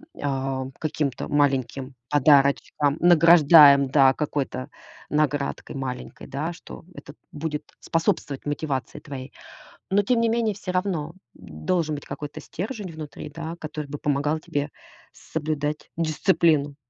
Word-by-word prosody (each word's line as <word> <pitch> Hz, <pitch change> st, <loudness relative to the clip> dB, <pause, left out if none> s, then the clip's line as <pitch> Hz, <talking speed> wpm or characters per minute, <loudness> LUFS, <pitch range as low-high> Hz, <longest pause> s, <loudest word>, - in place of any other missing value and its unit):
м, -, -, -11 dB
а, 135 Hz, -1 st, -2 dB
каким-то 150 Hz, -4 st, -2 dB
маленьким 135 Hz, -2 st, 0 dB, 0.2 s
подарочком 145 Hz, 0 st, +3 dB
награждаем, 160 Hz, -5 st, +7 dB
да, 135 Hz, -1 st, +5 dB
какой-то 140 Hz, -2 st, -3 dB, 0.4 s
наградкой 145 Hz, -1 st, -1 dB
маленькой, 130 Hz, -2 st, -6 dB
да, 155 Hz, +5 st, -3 dB
что 170 Hz, -, -12 dB
это 145 Hz, -, -11 dB, 0.2 s
будет 150 Hz, 0 st, -4 dB, 0.2 s
способствовать 155 Hz, -4 st, -1 dB
мотивации 145 Hz, -2 st, -3 dB
твоей. 135 Hz, -2 st, -8 dB, 0.6 s
Но 195 Hz, +2 st, +4 dB
тем 230 Hz, +3 st, +2 dB
не 230 Hz, -, +3 dB
менее 225 Hz, -2 st, +1 dB
всё 185 Hz, -2 st, -5 dB
равно, 180 Hz, -4 st, -1 dB, 0.2 s
м, 80 Hz, -4 st, -12 dB
должен 165 Hz, -4 st, +1 dB
быть 145 Hz, -, -8 dB
какой-то 145 Hz, +1 st, -7 dB
стержень 205 Hz, +1 st, -6 dB
внутри, 155 Hz, -2 st, -8 dB
да, 160 Hz, +3 st, -6 dB
который 155 Hz, -1 st, -5 dB
бы 145 Hz, +1 st, -6 dB
помогал 145 Hz, +2 st, 0 dB
тебе 145 Hz, -1 st, -3 dB, 0.4 s
соблюдать 150 Hz, -1 st, -4 dB
дисциплину. 155 Hz, -3 st, +2 dB
150 Hz, 130 wpm, -24 LUFS, 140-165 Hz, 0.6 s, награждаем